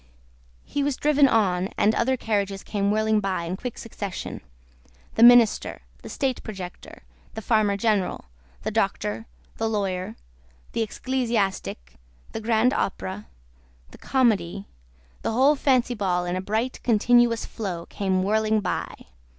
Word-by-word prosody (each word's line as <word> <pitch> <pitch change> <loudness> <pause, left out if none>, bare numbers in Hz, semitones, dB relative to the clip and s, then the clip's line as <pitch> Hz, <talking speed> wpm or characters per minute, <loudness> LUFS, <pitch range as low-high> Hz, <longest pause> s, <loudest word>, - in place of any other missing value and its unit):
He 285 - -2
was 280 -2 0
driven 295 -1 +4
on, 190 -6 +1
and 215 - +3
other 260 +3 +1
carriages 200 -4 -2
came 200 -1 -1
whirling 215 +1 +2
by 190 -4 -2
in 170 +2 -3
quick 245 +4 -6
succession; 205 -4 -6 0.7
the - - -1
Minister, 240 -2 +6 0.2
the - - -9
State 265 -3 -2
Projector, 190 -5 -9 0.3
the 220 - -5
Farmer 210 -3 +2
General, 210 -4 0 0.4
the - - -2
Doctor, 110 +2 -1 0.3
the 225 - -1
Lawyer, 190 -4 -2 0.6
the - - -2
Ecclesiastic, 215 - -2 0.3
the - - -5
Grand 230 +3 +2
Opera, 195 -4 -3 0.6
the - - -14
Comedy, 205 -7 +1 0.6
the - - -2
whole 270 +5 +4
Fancy 255 -3 +2
Ball 180 -5 0
in 175 0 -2
a 185 - -2
bright 220 +6 -2
continuous 235 0 +3
flow, 180 -6 -5
came 190 -2 -1
whirling 215 +2 +2
by. 190 -3 -2
215 Hz, 135 wpm, -25 LUFS, 190-235 Hz, 0.7 s, Minister